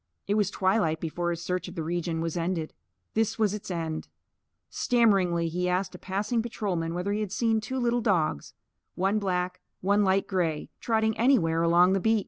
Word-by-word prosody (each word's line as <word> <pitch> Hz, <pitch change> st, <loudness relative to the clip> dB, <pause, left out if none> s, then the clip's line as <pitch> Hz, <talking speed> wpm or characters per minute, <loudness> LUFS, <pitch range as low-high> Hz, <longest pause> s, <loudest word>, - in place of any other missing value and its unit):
It 200 Hz, -, 0 dB
was 205 Hz, -2 st, +2 dB
twilight 185 Hz, -5 st, +1 dB
before 175 Hz, +2 st, -2 dB
his 170 Hz, 0 st, -3 dB
search 180 Hz, +1 st, -2 dB
of 180 Hz, -, -9 dB
the 165 Hz, -, -3 dB
region 170 Hz, 0 st, -2 dB
was 165 Hz, 0 st, -2 dB
ended. 170 Hz, -2 st, -2 dB, 0.4 s
This 225 Hz, -1 st, 0 dB
was 215 Hz, -3 st, +2 dB
its 210 Hz, -2 st, -6 dB
end: 165 Hz, -3 st, -3 dB, 0.6 s
Stammeringly 195 Hz, -8 st, +2 dB
he 180 Hz, +2 st, -1 dB
asked 180 Hz, +1 st, 0 dB
a -, -, -10 dB
passing 205 Hz, +4 st, -1 dB
patrolman 185 Hz, -8 st, -2 dB
whether 185 Hz, +3 st, -1 dB
he 210 Hz, -, -1 dB
had 210 Hz, -3 st, -3 dB
seen 225 Hz, +1 st, +1 dB
two 260 Hz, +5 st, -4 dB
little 240 Hz, -1 st, +1 dB
dogs 165 Hz, -, 0 dB, 0.4 s
one 195 Hz, +3 st, +1 dB
black, 180 Hz, -2 st, -2 dB, 0.2 s
one 200 Hz, +2 st, +3 dB
light 195 Hz, 0 st, +2 dB
grey 175 Hz, -6 st, -1 dB
trotting 220 Hz, -1 st, +1 dB
anywhere 180 Hz, -11 st, +3 dB
along 175 Hz, +2 st, +5 dB
the 195 Hz, -, +2 dB
beat. 220 Hz, +3 st, +3 dB
185 Hz, 185 wpm, -27 LUFS, 170-215 Hz, 0.6 s, along